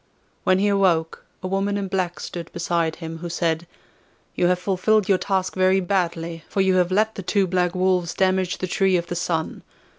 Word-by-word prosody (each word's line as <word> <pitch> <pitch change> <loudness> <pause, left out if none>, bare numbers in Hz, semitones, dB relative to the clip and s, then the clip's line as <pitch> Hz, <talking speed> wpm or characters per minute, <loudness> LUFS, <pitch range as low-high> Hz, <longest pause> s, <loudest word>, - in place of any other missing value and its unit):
When 185 - +4
he 200 +2 +2
awoke 185 -5 +1 0.2
a - - -2
woman 195 +2 0
in 200 -1 -2
black 185 -2 -2
stood 170 -1 -7
beside 170 -1 -1
him, 165 -1 -7
who 175 +1 -5
said: 165 -1 -1 0.7
'You 175 - +2
have 180 0 +3
fulfilled 195 +3 +1
your 190 -2 +3
task 190 -2 -1
very 185 0 +3
badly, 170 -3 -2
for - - -3
you 190 -1 +3
have 180 0 +2
let 215 +3 +2
the 195 - -6
two 195 +2 +1
black 180 0 0
wolves 180 -2 +1
damage 185 -1 +1
the - - -3
Tree 190 0 +2
of 170 - -2
the 175 - -5
Sun. 165 -2 -2
185 Hz, 200 wpm, -23 LUFS, 170-190 Hz, 0.7 s, When